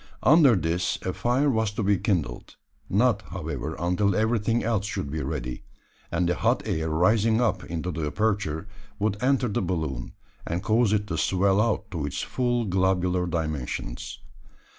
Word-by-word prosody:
Under 145 -4 +6
this 85 0 0
a 95 - -2
fire 125 +4 +1
was 110 -3 +1
to 105 - -2
be 100 -1 +2
kindled 80 - -2 0.3
not, 110 +1 +3
however, 80 -4 -4
until 90 +3 +1
everything 110 +1 +1
else 110 -3 0
should 70 -8 -4
be 80 +1 -2
ready; 65 -3 -4 0.5
and 85 +1 +1
the 90 - +2
hot - - +1
air 80 0 -1
rising 105 +8 +3
up 120 -2 +1
into 85 +2 -3
the 80 -3 -3
aperture 100 -1 -1 0.3
would 105 0 -1
enter 130 -1 +2
the 105 - -1
balloon, 80 -9 -3 0.3
and 85 +3 -3
cause 110 +1 +3
it 105 -1 +1
to 85 -5 -3
swell 95 +2 +2
out 115 -3 -1
to 85 -5 -3
its 75 - -3
full 120 -2 0
globular 90 -1 +1
dimensions. 75 -7 -3
95 Hz, 160 wpm, -26 LUFS, 80-110 Hz, 0.5 s, Under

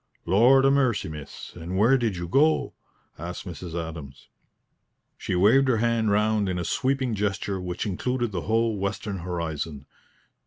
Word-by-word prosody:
"Lord 120 +9 +5
'a 135 - +5
mercy, 130 - +1
miss, 75 -2 -9
and 85 +2 -5
where 115 +7 +5
did 115 -7 0
you 85 0 -4
go?" 150 - +2 0.5
asked 85 +4 -6
Mrs. 90 -2 -7
Adams. 80 -5 -7 0.9
She - - -3
waved 115 +9 +5
her 125 -3 +3
hand 115 -1 +1
round 105 -1 +2
in 90 - -2
a 90 - -2
sweeping 130 +1 0
gesture 100 -2 -2
which 90 -1 -4
included 120 +4 -2
the 90 -3 -3
whole 110 +1 0
western 100 0 -3
horizon. 80 -5 -4
100 Hz, 155 wpm, -25 LUFS, 85-115 Hz, 0.9 s, Lord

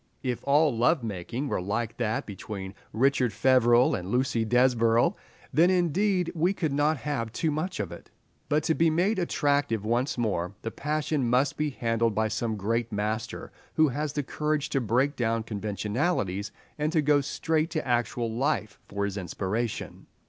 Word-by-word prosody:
If 125 -3 -2
all 145 -1 +4
love 125 +5 +2
making 115 +6 -4
were 95 - -1
like 110 +4 -2
that 115 -2 -1
between 100 -1 -7 0.2
Richard 130 +1 +2
Feverel 120 +1 +4
and 90 +1 -3
Lucy 125 0 +1
Desborough, 120 -1 +3 0.4
then 165 +6 +5
indeed 180 +1 +1
we 175 +3 +1
could 160 -7 -2
not 150 +2 +2
have 135 -5 -3
too 155 +6 -1
much 155 - -3
of 100 -5 -3
it; 85 - -11 0.4
but 150 +1 +2
to 160 - +2
be 165 +1 +3
made 185 +6 +1
attractive 145 - 0
once 120 +5 0
more, 100 -5 -1
the 115 - -3
passion 150 -3 -1
must 130 +3 +2
be 150 0 0
handled 115 -4 0
by 110 0 +1
some 110 +1 -2
great 115 +4 -1
master 110 +2 -3 0.2
who 155 -1 +4
has 145 +2 -3
courage 150 +1 -1
to 135 - 0
break 125 +6 +1
down 115 -2 0
conventionalities 105 - -2 0.3
and 150 +1 0
to 155 -3 +3
go 145 0 +4
straight 160 +3 0
to 155 -5 -3
actual 120 -1 0
life 110 -5 -1
for 100 0 -2
his 100 0 -4
inspiration. 100 +5 -3
125 Hz, 165 wpm, -27 LUFS, 110-150 Hz, 0.4 s, then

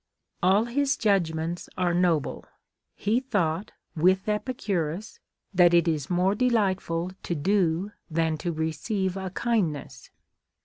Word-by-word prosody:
*• - - -57 0.4
All 195 +5 +4
his 275 +3 0
judgments 170 -5 0
are 180 -1 +1
noble. 175 -4 +1 0.5
He 215 +4 +1
thought, 200 -8 -1 0.2
with 185 +5 +3
Epicurus, 210 - -2 0.3
that 175 -2 +6
it 170 0 +4
is 150 -4 -1
more 180 +2 +2
delightful 195 -7 0
to 175 - -3
do 185 +2 +1 0.2
than 160 0 +1
to 175 - -2
receive 175 +5 -2
a 190 -1 -4
kindness. 190 -8 -2
185 Hz, 125 wpm, -26 LUFS, 165-210 Hz, 0.5 s, that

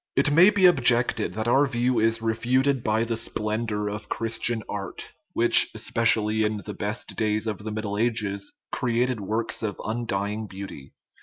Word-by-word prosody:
It 140 +2 +3
may 170 +6 +7
be 205 -3 +3
objected 125 -8 +3
that 110 +1 -2
our 135 +4 +4
view 125 -1 0
is 115 0 +1
refuted 125 +4 +1
by 110 +1 +1
the 115 0 -2
splendor 110 -1 -2
of 105 +1 -6
Christian 115 0 -1
art, - - -6 0.2
which, - - +5
especially 110 -1 +1
in 105 0 0
the 105 - -5
best 105 +4 -5
days 110 0 0
of 110 -1 -3
the 110 +1 -6
Middle 105 -1 -3
Ages, 105 -4 -1 0.2
created 125 -1 0
works 110 +3 -2
of 105 -2 -3
undying 110 -2 -2
beauty. 95 -8 -9
110 Hz, 160 wpm, -25 LUFS, 105-120 Hz, 0.2 s, may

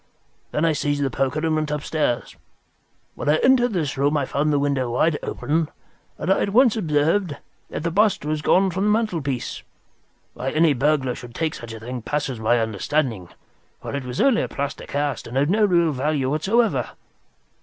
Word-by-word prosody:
Then 150 - 0
I 160 - +3
seized 145 -1 -1
the 135 - 0
poker 135 +6 -1
and 160 - +1
went 155 -1 0
downstairs. 150 -4 -1 0.8
When - - -3
I 150 - +5
entered 245 +4 +3
this 150 -6 -2
room 145 +2 +2
I 140 - 0
found 145 +3 0
the 145 - +2
window 140 -3 0
wide 150 +6 +1
open, 155 +1 -1 0.5
and 185 +5 +2
I - - -1
at - - 0
once 240 +2 +4
observed 160 -2 +1 0.3
that - - -5
the 170 - -1
bust 200 -3 +2
was 155 0 -1
gone 190 +4 +3
from 190 +4 -1
the - - +3
mantelpiece. 170 - -1 0.7
Why 130 - -3
any 155 +1 +3
burglar 135 -1 +1
should 120 -1 -10
take 160 -2 -1
such 120 -1 -8
a 115 - -8
thing 125 +2 -6
passes 140 -1 -2
my 110 +2 +2
understanding, 110 - -1 0.5
for - - -7
it 140 -1 -3
was 125 0 -5
only 265 -4 +4
a - - -2
plaster 140 0 -5
cast 145 -2 -2
and 120 +3 -4
of 145 +4 +2
no 215 +1 +4
real 170 -4 +3
value 140 -1 -1
whatever. 210 +10 +1
150 Hz, 190 wpm, -23 LUFS, 135-170 Hz, 0.8 s, I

